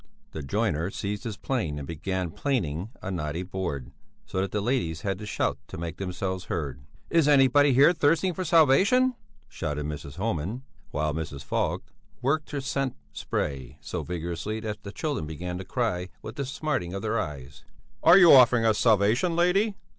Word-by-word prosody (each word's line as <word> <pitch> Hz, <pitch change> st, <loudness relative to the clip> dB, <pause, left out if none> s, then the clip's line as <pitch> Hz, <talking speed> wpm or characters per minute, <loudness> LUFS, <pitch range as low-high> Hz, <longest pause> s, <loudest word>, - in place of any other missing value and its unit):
The 80 Hz, -, -6 dB
joiner 75 Hz, +4 st, 0 dB
seized 105 Hz, +3 st, -4 dB
his 110 Hz, -3 st, -4 dB
plane 90 Hz, -, -2 dB
and 70 Hz, -2 st, -6 dB
began 90 Hz, +2 st, -3 dB
planing 95 Hz, -, -2 dB
a 95 Hz, -, -3 dB
knotty 80 Hz, -1 st, -3 dB
board, 90 Hz, -8 st, -4 dB, 0.3 s
so 95 Hz, -, -2 dB
that 95 Hz, -, -1 dB
the 105 Hz, -, 0 dB
ladies 100 Hz, -8 st, -1 dB
had 95 Hz, 0 st, -2 dB
to 105 Hz, -, -7 dB
shout -, -, -1 dB
to -, -, -8 dB
make 85 Hz, 0 st, -5 dB
themselves 95 Hz, -1 st, -3 dB
heard. 70 Hz, -7 st, -4 dB, 0.3 s
"Is 165 Hz, -3 st, +4 dB
anybody 145 Hz, 0 st, +5 dB
here 140 Hz, +7 st, +6 dB
thirsting 165 Hz, +4 st, +2 dB
for 185 Hz, -, -3 dB
salvation?" 185 Hz, -, +4 dB, 0.3 s
shouted 75 Hz, -1 st, -4 dB
Mrs. 75 Hz, -1 st, -6 dB
Homan, 100 Hz, -, -2 dB, 0.3 s
while 75 Hz, 0 st, -1 dB
Mrs. 75 Hz, -3 st, -5 dB
Falk -, -, -1 dB, 0.4 s
worked 140 Hz, +5 st, 0 dB
her 145 Hz, -2 st, -3 dB
scent 135 Hz, -1 st, -2 dB, 0.2 s
spray 70 Hz, -2 st, -3 dB
so -, -, -4 dB
vigorously 85 Hz, +5 st, -4 dB
that 105 Hz, -1 st, -5 dB
the 100 Hz, -, -8 dB
children 145 Hz, -, -3 dB
began 90 Hz, +3 st, -5 dB
to -, -, -5 dB
cry 95 Hz, -6 st, -1 dB
with -, -, -7 dB
the 140 Hz, -, -3 dB
smarting 130 Hz, -, -2 dB
of 100 Hz, -, -4 dB
their 110 Hz, +1 st, 0 dB
eyes. 70 Hz, -4 st, -6 dB, 0.4 s
"Are 170 Hz, +3 st, +8 dB
you 175 Hz, -4 st, +9 dB
offering 125 Hz, -3 st, +7 dB
us 110 Hz, -2 st, +3 dB
salvation, 115 Hz, -, +3 dB
lady?" 195 Hz, +5 st, +2 dB
100 Hz, 175 wpm, -27 LUFS, 80-135 Hz, 0.4 s, you